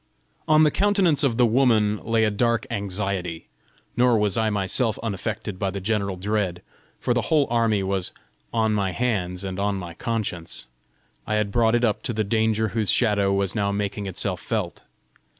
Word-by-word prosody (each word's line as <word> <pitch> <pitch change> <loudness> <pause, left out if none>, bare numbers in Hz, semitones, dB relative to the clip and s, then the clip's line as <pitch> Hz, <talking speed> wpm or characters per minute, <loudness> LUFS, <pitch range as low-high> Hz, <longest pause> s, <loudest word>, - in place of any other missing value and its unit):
On 155 0 +5
the 150 - +4
countenance 195 -7 +2
of 125 -5 +1
the 125 - +5
woman 110 -3 +3
lay 115 +1 0
a 105 - +2
dark 115 +2 +1
anxiety; 100 -5 -3 0.5
nor 120 -1 +4
was 105 -2 +1
I 110 -1 +1
myself 105 +3 0
unaffected 105 -2 -4
by 100 - 0
the 100 +1 -4
general 100 -1 -1
dread, 95 -2 -2 0.4
for 120 - 0
the 120 - +1
whole 155 -3 +4
army 115 -4 +2
was 95 -1 -1 0.4
on 110 -1 +1
my 100 -3 0
hands 95 -7 -1
and 95 -1 -4
on 100 0 0
my 90 -3 -6
conscience: 100 -5 -4 0.6
I 110 - 0
had 105 -1 0
brought 115 +1 +3
it 120 0 +2
up 105 -3 0
to 120 - -3
the 110 0 0
danger 110 +1 +1
whose 110 -1 -1
shadow 105 -4 +3
was 100 -1 0
now 100 -2 0
making 100 0 -3
itself 95 - -3
felt! - - -3
105 Hz, 180 wpm, -24 LUFS, 100-115 Hz, 0.6 s, On